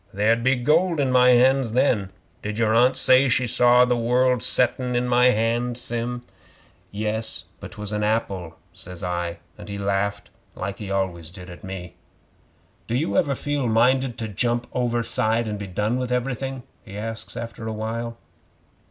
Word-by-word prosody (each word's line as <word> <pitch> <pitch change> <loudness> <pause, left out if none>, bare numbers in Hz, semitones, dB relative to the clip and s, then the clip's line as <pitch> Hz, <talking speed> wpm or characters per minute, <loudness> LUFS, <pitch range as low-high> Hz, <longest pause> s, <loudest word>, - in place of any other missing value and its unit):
There'd 110 +3 +2
be 130 +2 +3
gold 155 +7 +2
in 135 -2 +1
My 125 0 +5
hands 125 -1 +4
then. 115 -6 +2 0.3
Did 105 0 -4
your 110 -1 +2
Aunt 125 +3 +4
say 130 +1 +5
she 125 +1 +2
saw 125 +1 +5
the 125 0 +1
world 125 +1 +2
settin' 125 +1 +2
in 120 +1 +1
my 125 0 +4
hand, 120 +1 +1
Sim?" 120 0 -4 0.7
'"Yes, 110 +2 -3
but - - -9
'twas 105 0 -6
a 105 0 -1
apple," 100 -6 -2 0.2
says 90 -2 -9
I, 85 -1 -3 0.2
and 105 0 -10
he 100 - -4
laughed 100 +1 -2 0.2
like 100 +1 -5
he 105 -3 -6
always 95 -4 -2
did 90 0 -11
at 90 - -12
me. 95 -2 -8 0.9
"Do 115 - -1
you 125 -7 -1
ever 140 +5 +2
feel 145 -1 -2
minded 125 +2 +2
to 110 - -3
jump 120 +4 -1
overside 115 -2 0
and 105 -1 -4
be 100 - -6
done 105 +6 -1
with 125 -1 -3
everything?" 130 +1 -2 0.2
he 100 -3 -9
asks 110 +1 -6
after 115 -1 -6
a - - -2
while. 115 +2 -4
115 Hz, 170 wpm, -23 LUFS, 105-125 Hz, 0.9 s, My